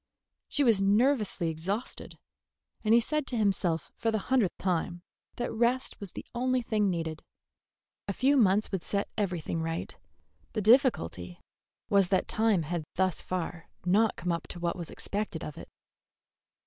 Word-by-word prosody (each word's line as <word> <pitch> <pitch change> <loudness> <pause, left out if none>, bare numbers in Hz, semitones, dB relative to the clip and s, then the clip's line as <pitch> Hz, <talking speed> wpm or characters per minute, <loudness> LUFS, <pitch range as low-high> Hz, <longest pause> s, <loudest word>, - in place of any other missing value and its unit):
She 290 - +2
was 225 -6 +4
nervously 210 -3 +2
exhausted; 190 +9 -4 0.7
and 215 - +1
he - - +7
said 300 +4 -1
to 245 - -1
himself 190 -6 +1
for 230 - -1
the 220 - +1 0.2
hundredth 220 -9 +2
time 175 -1 -1 0.3
that 240 - -3
rest 240 +3 0
was 200 -3 -8
the - - -7
only 255 +1 +1
thing 210 -3 +1
needed. 165 -3 -3 0.9
A 200 - -1
few 270 +7 +3
months 210 -4 +3
would 190 -3 -1
set 200 +4 -2
everything 175 -5 -2
right. 165 +1 -3 0.6
The 215 - -1
difficulty 190 - +3 0.5
was 195 -2 +4
that 190 0 +1
time 215 -6 +2
had 165 +1 -3
thus 185 -1 +1
far 175 -2 -4 0.2
not 210 +5 +3
come 180 +1 -2
up 170 - -3
to 175 - -7
what 170 0 -1
was 175 -3 -5
expected 200 -5 -3
of 150 - -6
it. - - -10
195 Hz, 160 wpm, -29 LUFS, 170-225 Hz, 0.9 s, he